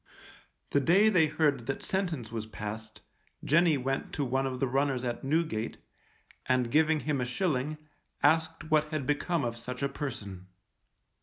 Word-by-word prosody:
The 140 - +4
day 185 +10 +5
they 175 -7 +4
heard 145 -6 +1
that 205 - -3
sentence 170 - -2
was 110 -2 -4
passed, 110 0 -7 0.4
Jenny 160 0 +4
went 135 +1 -2
to 145 - -1
one 135 +2 0
of 130 -1 -4
the 135 - +2
runners 135 0 0
at 120 -1 -3
Newgate, 135 -6 -1 0.7
and 125 -2 +2
giving 155 0 +3
him 145 -4 -1
a - - 0
shilling, 150 0 -1 0.5
asked 160 +1 +2
what 155 -1 +4
had 155 -3 -3
become 150 +2 0
of 115 0 -3
such 125 +3 -6
a 140 - +1
person. 100 -10 -6
140 Hz, 160 wpm, -30 LUFS, 120-155 Hz, 0.7 s, day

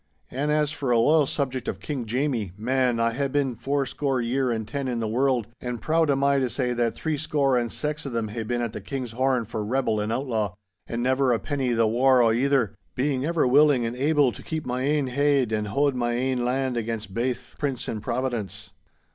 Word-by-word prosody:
An' 140 +4 -1
as 150 -1 +2
for 140 -4 -3
a 120 - +4
loyal 150 +5 +4
subject 130 -4 -2
of - - -3
King 135 -6 -4
Jamie, 120 -6 -1
man, 125 +1 +1
I 115 0 +2
hae 140 +3 0
been 135 -2 0
four 135 +4 -1
score 135 -1 -1
year 125 +2 0
and 110 -2 -2
ten 140 +3 -3
in 120 -2 -1
the 115 - -1
world, 125 +1 +1 0.2
and 125 -1 -4
proud 160 +2 +1
am 140 0 +2
I 140 0 +4
to 130 -2 0
say 125 -1 -1
that 120 -1 0
three 160 -2 -2
score 140 -3 +1
and 120 -2 0
sax 150 0 -3
o' - - -3
them 115 -3 -2
hae 115 +2 -4
been 120 +2 -2
at 115 -2 -3
the - - -6
King's 130 -4 -5
Horn 130 0 +1
for 110 -1 -4
rebel 115 -1 0
and 105 +1 -2
outlaw—an' 110 -3 -3
never 130 0 +2
a 120 - +3
penny 135 -4 -1
the 115 -1 +3
waur 125 +3 +4
o' 115 - +4
either, 125 -2 +2 0.2
being 135 0 0
ever 165 -2 +1
willing 135 -1 +5
and 115 +1 -3
able 145 0 +3
to - - -11
keep 160 -1 -4
my 125 0 -2
ain 145 +1 +1
heid 140 -2 +2
and 105 -1 -1
haud 140 +7 +1
my 120 -1 -1
ain 125 0 0
land 130 0 0
again 115 -1 -2
baith 125 +2 -3
prince 140 -5 -2
and 110 - -3
Providence! 105 -6 -3
125 Hz, 225 wpm, -25 LUFS, 115-140 Hz, 0.2 s, willing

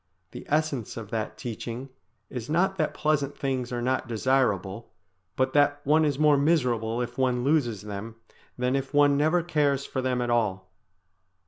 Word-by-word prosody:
The - - -9
essence 150 -8 -1
of 110 -2 -7
that 110 -1 -3
teaching 120 +2 -6 0.4
is 125 -1 -6
not 180 +5 +2
that 155 -3 -1
pleasant 145 -2 0
things 130 -3 -2
are 120 -1 -2
not 130 0 0
desirable, 115 -4 0 0.5
but 130 0 0
that 145 0 +3
one 155 +2 +4
is 145 -3 0
more 150 -1 +5
miserable 125 -6 +1
if 120 +1 -7
one 125 -2 +1
loses 125 -8 +1
them 105 +2 -6 0.4
than 125 +1 0
if 135 +1 -3
one 145 -1 +5
never 160 +4 +2
cares 145 -5 +1
for 130 - -3
them 130 -1 0
at 120 -1 -1
all. 95 -6 0
130 Hz, 165 wpm, -27 LUFS, 115-145 Hz, 0.5 s, more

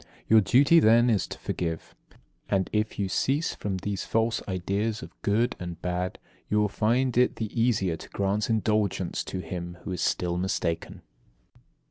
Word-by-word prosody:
Your 110 0 +6
duty 140 - +5
then 120 -1 +5
is 105 - +1
to - - -7
forgive. 80 -2 -4 0.6
And, 95 -2 0
if 110 0 0
you 100 - 0
cease 140 - 0
from 100 -2 -3
these 100 +1 -3
false 115 +1 0
ideas 100 +4 -2
of - - -10
good 115 +4 +1
and 85 -2 -6
bad, 90 +1 -2 0.3
you 105 - +2
will 105 -1 +2
find 120 +5 +1
it 125 - +3
the 110 -2 -4
easier 115 -7 +1
to - - -12
grant 100 +2 -1
indulgence 105 -4 0
to 95 - -4
him 85 0 -6
who - - -5
is 90 -2 -3
still 85 0 0
mistaken. 90 -2 -2
100 Hz, 165 wpm, -27 LUFS, 90-115 Hz, 0.6 s, Your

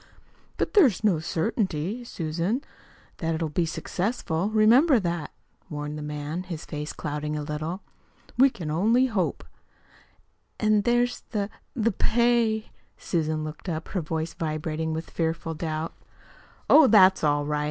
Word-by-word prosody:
"But - - -1
there's 275 - +5
no 195 -7 +3
certainty, 190 +4 -2
Susan, 175 - -2 0.5
that 165 -1 -1
it'll 160 -1 -2
be 165 +3 0
successful; 185 +1 -2
remember 235 +6 +5
that," 170 -5 -2 0.4
warned 150 0 -4
the 150 - -6
man, 150 +3 -4
his 175 -4 -7
face 150 -1 -5
clouding 150 0 -4
a 150 - -3
little. 155 +5 -4 0.5
"We 270 +2 +6
can 165 -11 -6
only 225 +10 +3
hope." 215 -8 -1 1.2
"An' 215 -1 +3
there's 240 +2 +1
the 210 -2 -2 0.2
the 230 -2 +2
pay." 230 0 +1 0.3
Susan 155 -2 -1
looked 155 +4 -6
up, 160 -1 -4
her 185 - -2
voice 160 +1 -3
vibrating 155 0 -3
with 160 +1 -5
fearful 165 0 -2
doubts. 155 0 -3 0.7
"Oh, 310 -3 +8
that's 190 -5 +6
all 145 -1 +2
right." 150 0 -1
170 Hz, 140 wpm, -26 LUFS, 155-215 Hz, 1.2 s, Oh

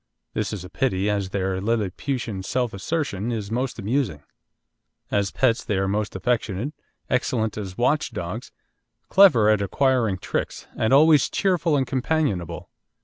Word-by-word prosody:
This 110 -2 -2
is 100 -5 -5
a - - -10
pity, 105 -6 0
as 100 -2 -1
their 95 -1 -1
lilliputian 110 +1 -2
self 125 +4 -1
assertion 115 - -2
is 110 -3 -4
most 125 +2 -2
amusing. 110 - -1 0.9
As 100 -1 +1
pets 125 +1 +1
they 105 -6 -1
are 95 0 +1
most 105 +1 -1
affectionate, 115 +4 -1 0.3
excellent 120 -4 0
as 95 -3 -6
watch 145 +5 +2
dogs, 105 +2 -5 0.6
clever 180 - +6
at 105 -1 +4
acquiring 115 -1 +1
tricks, - - -3
and 110 - 0
always 150 +1 +6
cheerful 175 -5 +1
and 135 - +1
companionable. 120 - -1
110 Hz, 145 wpm, -24 LUFS, 100-130 Hz, 0.9 s, clever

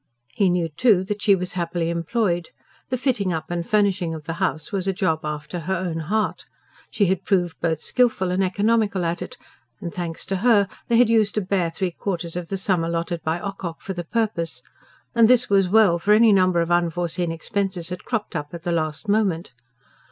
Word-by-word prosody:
He 195 -3 +2
knew, 175 -2 +1
too, 190 +4 +3
that 205 +2 -4
she 200 -1 +5
was 180 -1 -4
happily 170 -1 -1
employed; 175 0 -1 0.4
the 255 - 0
fitting 240 -7 0
up 160 0 -4
and 175 -1 -1
furnishing 190 -4 +1
of 155 - -8
the 165 - -4
house 180 +2 -1
was 195 -2 -1
a 195 - +1
job 180 -5 0
after 150 +3 -4
her 185 +4 -2
own 170 -2 -3
heart. 210 +7 -1 0.5
She 205 - +1
had 190 0 0
proved 175 -4 0
both 165 -2 0
skilful 225 -7 +1
and 185 +1 +1
economical 205 0 +1
at 170 +1 -2
it: - - -7 0.5
thanks 170 -2 -4
to 195 - -1
her, 205 -1 +4 0.2
they 235 - +3
had 240 -1 +5
used 215 -2 +2
a - - +3
bare 185 -3 0
three 180 +2 -2
quarters 170 -2 -4
of 175 -2 -5
the 195 - -2
sum 185 -3 +1
allotted 170 0 -2
by 160 +2 -1
Ocock 190 -4 -5
for 195 - -5
the 175 -1 -4
purpose 170 - -2 0.5
and 230 -1 +5
this 245 -2 +4
was 195 -2 +4
well; 200 -4 +5
for 210 +5 +4
any 220 -1 +6
number 185 -3 +3
of 170 +1 -2
unforeseen 175 0 0
expenses 185 +1 -2
had 180 0 -6
cropped 225 -4 -3
up 145 +2 -4
at 170 - -9
the 175 - -1
last 155 +4 -2
moment. 200 -7 +1
180 Hz, 205 wpm, -23 LUFS, 170-205 Hz, 0.5 s, any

